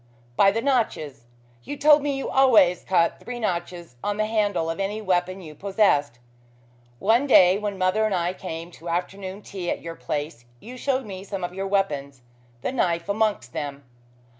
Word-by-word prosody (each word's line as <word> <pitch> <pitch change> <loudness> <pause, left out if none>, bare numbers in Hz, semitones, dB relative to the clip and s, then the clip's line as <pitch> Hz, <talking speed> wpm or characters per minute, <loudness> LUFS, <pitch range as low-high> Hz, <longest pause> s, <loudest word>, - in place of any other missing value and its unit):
"By 195 - +6
the 225 +3 -1
notches. 215 - -1 0.4
You 290 - -6
told 295 +1 +6
me 280 -1 -1
you 270 - -3
always 225 -10 +4
cut 170 -3 +2
three 245 0 -7
notches 175 - -4
on 205 0 -1
the 215 - +1
handle 205 -6 0
of 165 +3 -3
any 200 +2 -2
weapon 185 -2 0
you 155 -4 -10
possessed. 150 - +1 0.8
One 230 - +2
day 185 -6 +6
when 205 -2 -3
mother 185 +4 +2
and 205 - 0
I 175 0 0
came 170 -2 -7
to 170 0 -9
afternoon 190 +3 -4
tea 180 -3 -5
at - - -3
your 165 0 -5
place 145 -6 -5
you 245 - -10
showed 260 0 -1
me 190 -2 -7
some 195 -2 -5
of 175 0 -3
your 195 +1 -3
weapons 140 -10 -1 0.4
the - - -1
knife 170 -8 0
amongst 205 - 0
them. 145 -2 -5
190 Hz, 180 wpm, -24 LUFS, 170-215 Hz, 0.8 s, By